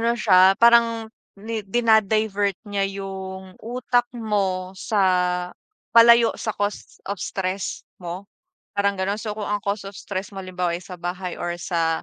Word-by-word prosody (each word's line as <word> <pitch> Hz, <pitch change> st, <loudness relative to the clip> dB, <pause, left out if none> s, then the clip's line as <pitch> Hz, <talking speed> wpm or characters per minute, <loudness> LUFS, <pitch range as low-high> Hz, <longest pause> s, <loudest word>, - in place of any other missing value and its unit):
Ano 235 Hz, +1 st, +1 dB
siya 190 Hz, -3 st, +5 dB
parang 230 Hz, -1 st, +5 dB, 0.3 s
ni 225 Hz, +1 st, -3 dB
dina-divert 215 Hz, -2 st, +2 dB
niya 200 Hz, -1 st, 0 dB
yung 190 Hz, -1 st, -7 dB
utak 245 Hz, +1 st, 0 dB
mo 195 Hz, -5 st, -1 dB
sa 180 Hz, -4 st, +1 dB, 0.4 s
palayo 235 Hz, 0 st, +7 dB
sa 220 Hz, -, -2 dB
cause 205 Hz, 0 st, -4 dB
of 200 Hz, -2 st, -3 dB
stress 185 Hz, +1 st, -3 dB, 0.2 s
mo, 180 Hz, +3 st, -6 dB, 0.5 s
parang 200 Hz, 0 st, +1 dB
gano'n. 195 Hz, +2 st, -1 dB
So, 215 Hz, -1 st, -4 dB
kung 210 Hz, -2 st, -4 dB
ang 205 Hz, 0 st, -1 dB
cause 200 Hz, 0 st, -2 dB
of 195 Hz, -, -12 dB
stress 190 Hz, 0 st, -5 dB
mo 195 Hz, -, -5 dB
halimbawa 180 Hz, -2 st, -2 dB
ay 180 Hz, -, -10 dB
sa 180 Hz, -, -9 dB
bahay 180 Hz, +1 st, -4 dB
or 175 Hz, 0 st, -2 dB
sa 165 Hz, -2 st, 0 dB
200 Hz, 155 wpm, -23 LUFS, 185-220 Hz, 0.5 s, palayo